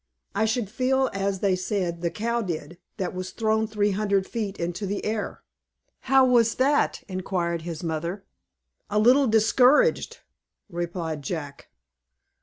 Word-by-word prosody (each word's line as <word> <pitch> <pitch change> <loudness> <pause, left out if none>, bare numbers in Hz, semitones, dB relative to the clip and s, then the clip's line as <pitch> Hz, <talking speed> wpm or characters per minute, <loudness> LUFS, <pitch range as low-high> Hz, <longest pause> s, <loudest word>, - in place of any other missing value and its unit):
I 220 +2 +1
should 220 0 0
feel 265 +5 +1
as 195 -1 -2
they 195 -2 +2
said 185 -2 -2
the 170 - 0
cow 235 +6 -1
did, 170 -3 -5 0.2
that 185 -4 -3
was 185 0 -5
thrown 220 +2 0
three 210 -1 0
hundred 200 -1 +1
feet 210 -3 -4
into 175 +4 -3
the 200 +1 -3
air." 215 -1 -3 0.7
"How 265 -1 +6
was 235 -3 +3
that?" 285 +3 +1
inquired 180 -3 -2
his 165 0 -6
mother. 170 +4 -3 0.6
"A 210 - -1
little 255 +6 +5
discouraged," 245 - +3 0.5
replied 170 -3 -3
Jack. 145 -2 -6
200 Hz, 140 wpm, -25 LUFS, 175-225 Hz, 0.7 s, How